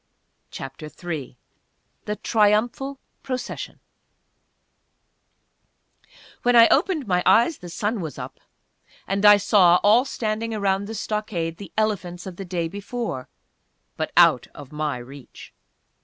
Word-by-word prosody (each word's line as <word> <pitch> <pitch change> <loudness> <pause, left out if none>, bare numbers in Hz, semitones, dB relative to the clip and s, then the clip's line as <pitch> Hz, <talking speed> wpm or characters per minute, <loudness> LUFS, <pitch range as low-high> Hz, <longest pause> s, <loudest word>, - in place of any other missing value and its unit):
CHAPTER 135 +3 -8
III 155 -7 -7 0.7
THE 210 - -2
TRIUMPHAL 225 +6 +1 0.2
PROCESSION 255 -2 -5 2.6
When 245 0 +2
I 230 -1 +9
opened 320 -8 +2
my 180 -3 +1
eyes 240 +8 +4
the 175 - -9
sun 210 +4 -2
was 160 -3 -6
up, - - -8 0.7
and 195 +1 -1
I 205 0 +9
saw, 185 -3 +5
all 225 +5 +5
standing 225 -3 -3
around 200 -1 0
the 225 - -6
stockade, 190 -7 -3
the 195 -5 -10
elephants 190 -5 -1
of 185 -2 -8
the 195 - -6
day 175 -2 -2
before 200 - -5 0.7
but - - -3
out - - +5
of 145 -1 -11
my 150 -3 -2
reach! 130 +2 -12
200 Hz, 125 wpm, -23 LUFS, 170-225 Hz, 2.6 s, I